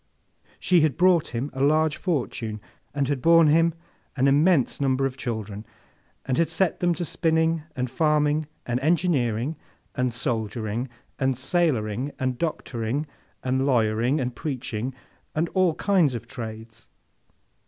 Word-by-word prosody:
She 180 -3 +4
had 150 -4 +1
brought 180 -3 +4
him 125 +4 -4
a 135 - -4
large 155 +2 +3
fortune, 120 - -2 0.3
and 140 -1 -1
had 140 -2 -1
borne 165 +1 +6
him 165 +2 +4 0.4
an 135 0 +2
immense 145 0 +3
number 135 -1 +2
of 135 -1 -2
children, 110 -5 -5 0.6
and 130 +2 0
had 165 - +2
set 165 +2 0
them 175 -1 +2
to 175 - -3
spinning, 160 0 +1
and 125 -1 -1
farming, 150 +2 +1 0.2
and 120 +1 -1
engineering, 145 -4 +1 0.4
and 125 -2 0
soldiering, 115 -1 -2 0.3
and 130 -2 +1
sailoring, 130 - 0
and 130 -1 -2
doctoring, 135 -4 -2 0.4
and 130 +1 +1
lawyering, 120 +2 +2
and 125 -2 -3
preaching, 130 -3 -4 0.4
and 165 +2 0
all 185 -4 +2
kinds 175 -10 +2
of 115 0 -6
trades. 115 -1 -8
135 Hz, 140 wpm, -25 LUFS, 120-160 Hz, 0.6 s, borne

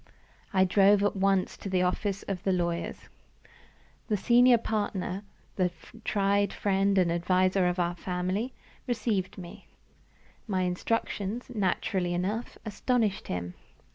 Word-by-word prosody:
I 190 -1 +4
drove 200 +2 +5
at 205 - +1
once 195 -1 +1
to 195 - -6
the 185 -1 +2
office 195 +2 -1
of 190 -2 -4
my 195 - +1
lawyers. 170 -2 -2 1.0
The 210 - +1
senior 245 +3 +5
partner 205 -3 -2 0.3
the 185 -2 +2 0.3
tried 200 0 +2
friend 195 0 +1
and 180 -3 +3
adviser 185 +2 +2
of 180 +1 0
our 175 -1 +1
family 185 +7 -2 0.4
received 220 -6 -1
me. 175 -2 -10 0.8
My 190 -3 0
instructions, 210 +5 -2
naturally 185 -3 0
enough, 205 +7 -2
astonished 220 -1 0
him. 90 0 -4
195 Hz, 125 wpm, -28 LUFS, 180-210 Hz, 1.0 s, drove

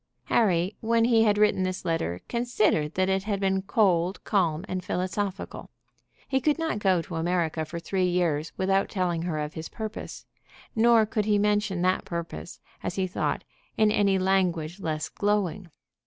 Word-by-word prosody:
Harry, 190 -3 +2
when 230 0 +3
he 230 -2 +4
had 210 -1 +3
written 210 -2 +3
this 185 0 -2
letter, 90 - -1
considered 215 -10 +1
that 185 0 +2
it 190 0 0
had 205 -2 -1
been 190 -1 +1
cold, 190 -3 +1
calm, 175 -4 +1
and 185 -1 -3
philosophical. 185 +2 -3 0.6
He 265 -1 +1
could 300 +3 +2
not 325 -10 -1
go 185 -4 +2
to 165 - -6
America 165 -2 0
for 170 +2 -7
three 185 +2 0
years 170 -4 0
without 195 +1 +1
telling 180 -4 -1
her 170 -2 -2
of 150 0 -3
his 160 0 -6
purpose; 220 0 -7 0.5
nor 230 0 +5
could 215 -1 -1
he 210 -1 +3
mention 205 -3 +1
that 185 +1 +2
purpose, 170 0 -6 0.2
as - - -3
he 190 - 0
thought, 185 - -2 0.3
in 215 -1 +4
any 200 -2 +3
language 185 -3 0
less 155 -4 -2
glowing. 205 -3 -1
190 Hz, 170 wpm, -27 LUFS, 170-210 Hz, 0.6 s, nor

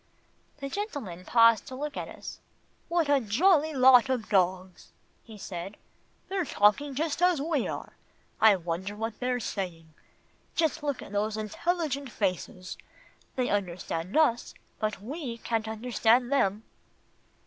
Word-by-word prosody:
The 275 -1 -5
gentleman 275 - -5
paused 230 0 +5
to 260 - -7
look 295 +2 -4
at - - -4
us. - - -9 0.5
"What 340 -2 +2
a 285 -1 +4
jolly 305 - +3
lot 260 -2 +6
of 250 -4 -1
dogs," 185 -2 0 0.4
he 220 -2 -12
said 190 0 -7 0.5
"they're 380 -1 -1
talking 265 +4 +2
just 310 +2 -1
as 360 -3 +4
we 295 -3 0
are. - - -6 0.5
I 220 -2 +7
wonder 180 +3 -4
what 225 +1 -4
they're 250 0 0
saying. 170 -8 -5 0.6
Just 320 -1 +1
look 285 -3 -2
at - - -12
those 210 +1 -1
intelligent 280 - -2
faces. 185 -2 -3 0.6
They 255 -1 0
understand 180 - -2
us, 270 -7 +2 0.2
but 215 -2 -2
we 260 -1 -5
can't 225 -1 -2
understand 235 +2 +2
them." 210 -6 +1
230 Hz, 135 wpm, -28 LUFS, 205-285 Hz, 0.6 s, I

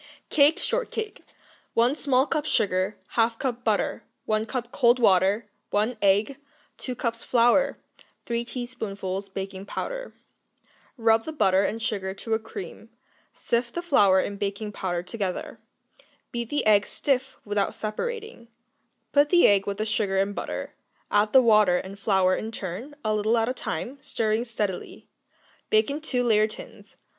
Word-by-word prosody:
Cake 295 +2 +5
Shortcake 450 -3 -3 0.5
1 240 +4 +3
small 270 -3 +2
cup 305 -1 -2
sugar. 190 -2 +1 0.2
1/2 230 0 +2
cup 250 -1 -3
butter. 215 -3 0 0.2
1 215 +1 0
cup 245 0 -4
cold 240 -3 +4
water. 200 -1 +3 0.2
1 215 +4 +1
egg. 205 +7 +3 0.4
2 255 - -4
cups 230 -1 -3
flour. 245 +4 +3 0.5
3 235 0 -1
teaspoonfuls 205 -6 -5
baking 195 0 -6
powder. - - -5 0.8
Rub 225 -1 +3
the 315 - -4
butter 195 -10 +3
and 225 - -1
sugar 190 -3 -2
to 225 +3 -4
a 220 - +2
cream; 220 -1 -9 0.5
sift 235 0 -1
the 345 - -2
flour 200 - +5
and 200 +1 -3
baking 205 +1 -3
powder 175 -3 -3
together; 185 0 -4 0.7
beat 235 -2 -4
the 290 - -1
egg 210 -1 +4
stiff 265 -1 -1
without 205 -1 -1
separating; 435 - -5 0.6
put 290 0 +4
the 350 -1 +6
egg 200 -1 +3
with 200 -1 -2
the 215 - -1
sugar 210 -3 0
and 195 +1 +1
butter, - - -5 0.4
add 210 +1 +3
the 260 -1 +7
water 210 -6 +5
and 195 +2 -7
flour 190 -3 +3
in 220 - -4
turn, 220 - -6
a 215 - +2
little 215 +2 +2
at 225 0 +1
a 250 - 0
time, 255 - -5
stirring 220 0 -1
steadily; 210 -5 -4 0.6
bake 435 -9 +3
in 295 +2 -4
two 255 -5 0
layer 215 -3 +4
tins. 215 - -12
220 Hz, 155 wpm, -26 LUFS, 200-250 Hz, 0.8 s, the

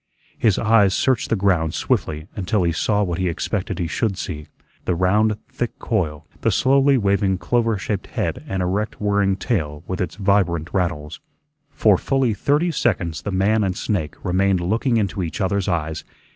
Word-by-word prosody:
His 110 -5 +3
eyes 110 -4 +4
searched 130 -3 +1
the - - +2
ground 90 -5 +1
swiftly 75 0 -1
until 100 0 0
he 85 - +2
saw 105 +5 +1
what 90 -3 -2
he 90 -1 +1
expected 95 +3 -3
he 90 - -1
should 100 +4 -1
see 75 -6 -5 0.4
the 90 - +1
round 105 +4 +2
thick 120 - -4
coil, 80 -10 -2 0.2
the - - +2
slowly 135 +1 +4
waving 100 -3 +1
clover 115 +2 +1
shaped 100 0 -3
head - - -3
and 95 -1 -1
erect 100 +4 -2
whirring 100 -2 +2
tail 80 - -2
with 95 - -3
its 90 - -3
vibrant 95 -5 +1
rattles. 80 -5 -2 0.5
For 105 -8 +3
fully 135 -4 +1
thirty 145 - +1
seconds 85 - -1
the 100 - -4
man 105 +3 +2
and 95 -1 -1
snake 80 -8 -2
remained 95 0 +2
looking 115 +7 +1
into 100 -2 -1
each 80 -3 -4
other's 100 0 0
eyes. 80 -3 -2
95 Hz, 170 wpm, -21 LUFS, 85-110 Hz, 0.5 s, eyes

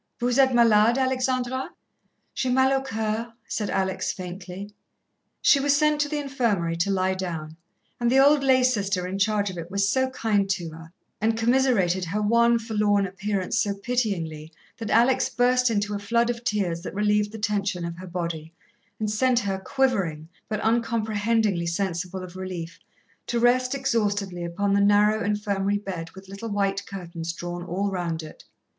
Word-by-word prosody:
"Vous 245 +2 +1
êtes 265 -1 +5
malade, 230 -1 +5
Alexandra?" 260 0 0 0.6
"J'ai 255 - -1
mal 260 +1 +4
au 270 - +1
coeur," 225 -2 -3
said 210 -2 -2
Alex 190 -1 -1
faintly. 185 +1 -7 0.8
She 285 - +6
was 285 +1 +3
sent 300 0 +2
to 290 - 0
the 300 - -2
infirmary 235 - 0
to 170 +4 0
lie 190 -1 +1
down, 165 -4 -5 0.4
and 240 -1 +2
the 265 - +4
old 280 +1 +5
lay 260 -1 +4
sister 200 -7 +1
in 190 +2 -4
charge 205 -1 +1
of 180 - -7
it 165 +1 -7
was 200 +1 +1
so 260 0 +1
kind 210 -6 0
to 175 -4 -2
her, 165 +1 -12 0.3
and 225 +1 +1
commiserated 225 -7 +2
her 190 +5 -2
wan, 235 +3 +4
forlorn 210 -3 +1
appearance 195 0 -2
so 200 -1 -1
pityingly, 195 -9 -2 0.3
that 225 -2 -4
Alex 250 +3 +3
burst 250 0 +3
into 205 -2 -1
a 205 - -2
flood 235 +4 +1
of 235 0 -8
tears 185 -7 -1
that 185 - -7
relieved 210 0 +1
the 220 - -7
tension 205 -5 -1
of 170 0 -6
her 185 - -8
body, 170 -3 -4 0.5
and 215 -1 -1
sent 250 +3 +2
her, 195 -2 -2
quivering, 190 - 0 0.2
but 215 -1 -1
uncomprehendingly 220 -4 +1
sensible 180 +1 -2
of 180 0 -10
relief, 185 -2 -6 0.5
to 240 - 0
rest 250 +2 +3
exhaustedly 205 -9 -1
upon 195 +4 -1
the 200 - +3
narrow 205 +2 +4
infirmary 205 -1 0
bed 185 -5 -6
with 190 0 -12
little 200 +4 -7
white 200 -1 -1
curtains 170 -3 -6
drawn 175 +1 -6
all 190 +3 -2
round 170 -3 -3
it. 155 - -12
205 Hz, 170 wpm, -25 LUFS, 185-235 Hz, 0.8 s, She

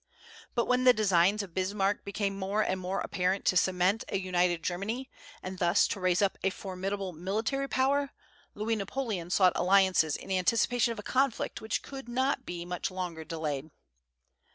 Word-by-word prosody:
But 235 - +2
when 250 0 +2
the 250 -1 +8
designs 200 -1 +3
of 185 -4 -11
Bismarck 195 +2 0
became 200 0 -2
more 200 +2 0
and 190 -2 -1
more 185 +2 -2
apparent 185 +1 -1
to - - +3
cement 185 +4 +2
a 195 - 0
united 180 -3 0
Germany, 215 +9 -3 0.3
and 185 0 -6
thus 175 +3 +4
to - - -3
raise 185 +1 +2
up 195 - 0
a - - +3
most 190 - -2
formidable 195 0 -4
military 215 - -2
power, 280 +2 +1 0.5
Louis 220 +2 -1
Napoleon 200 -4 -3
sought 185 0 +4
alliances 185 -5 +3
in - - -9
anticipation 230 +5 +2
of 230 - -5
a 210 - -6
conflict 265 0 0
which 220 -1 -2
could 270 -3 -9
not 260 +3 0
be 175 -1 -5
much 180 0 -3
longer 180 -4 -5
delayed. 155 -3 -4
195 Hz, 175 wpm, -30 LUFS, 180-220 Hz, 0.5 s, the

